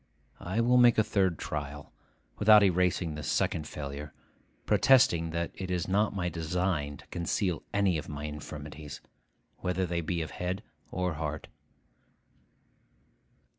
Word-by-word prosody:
I 95 +6 -1
will 125 +2 +4
make 120 -1 +6
a 110 - +5
third 95 -6 +1
trial, 75 -1 -5 0.5
without 105 0 +7
erasing 90 -3 +2
this 75 0 -5
second 75 -2 0
failure, 75 0 -7 0.5
protesting 90 -11 +4
that 85 +1 -2
it 95 -1 -6
is 90 0 -1
not 100 +2 +1
my 90 -3 -1
design 80 -3 -1
to - - -17
conceal 85 +1 -1
any 95 -5 +2
of 75 - -8
my 75 0 -6
infirmities, 75 0 -7 0.6
whether 90 +1 -1
they 85 -1 -1
be 85 0 -2
of 80 - -7
head 90 +2 -3 0.3
or 90 -1 -1
heart. 75 -1 -4
85 Hz, 135 wpm, -30 LUFS, 75-95 Hz, 0.6 s, without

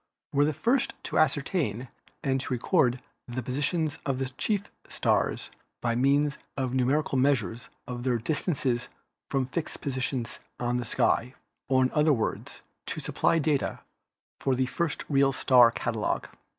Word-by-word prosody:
were 145 +1 +4
the 155 - +2
first 240 - +1
to - - 0
ascertain 140 - +1 0.4
and 135 -2 +1
to 140 - -6
record 125 0 +2 0.3
the 125 +1 -4
positions 150 +5 -1
of 135 -2 -1
the 130 0 -2
chief 200 - -1 0.3
stars - - 0 0.3
by 120 -1 0
means 140 +4 +2 0.2
of 130 -2 -1
numerical 130 +2 +2
measures 125 -3 +1 0.2
of 125 -1 -5
their 125 -1 +1
dis 145 - -2
tances 130 -7 0 0.4
from 135 -2 +1
fixed 155 +5 -4
positions 130 -3 -3 0.2
on 120 0 0
the 125 - -2
sky, 115 +3 +1 0.3
or 130 -1 +4
in 130 - +1
other 150 0 +4
words, 115 -4 -3 0.3
to - - -3
supply 165 - +1
data 150 -3 0 0.6
for 135 -1 +1
the 130 +1 +1
first 165 +4 -2
real 140 -1 +4
star 125 -3 +6
catalogue. 115 -2 -2
130 Hz, 150 wpm, -28 LUFS, 125-145 Hz, 0.6 s, star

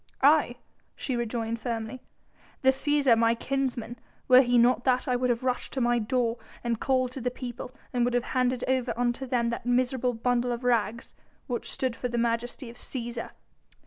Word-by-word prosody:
"Aye!" 290 -4 +5 0.4
she 260 - -3
rejoined 230 -1 -2
firmly, 230 +1 -4 0.6
"the 265 - +6
Cæsar, 280 -2 +3
my 230 0 +3
kinsman! 250 -2 -3 0.3
Were 255 0 +8
he 245 -2 +2
not 240 +1 +4
that, 255 -1 +2
I 250 - +2
would 250 0 0
have 240 0 0
rushed 255 -1 -2
to 265 - -2
my 240 -1 +2
door 235 +1 0 0.2
and 235 -2 -1
called 255 -2 +1
to 265 - -6
the 250 - 0
people, 245 -1 -7 0.2
and 245 -1 +2
would 245 0 +1
have 245 - +2
handed 255 -1 +1
over 255 -2 0
unto 245 +2 -1
them 235 -2 +1
that 235 +1 -5
miserable 250 0 +1
bundle 245 +1 +1
of 240 +1 -4
rags 235 -2 0 0.3
which 245 -2 -3
stood 255 -3 -1
for 250 - -3
the 240 -1 -3
majesty 235 +2 -1
of 240 - -16
Cæsar!" 240 -2 -5
245 Hz, 185 wpm, -27 LUFS, 235-255 Hz, 0.6 s, Were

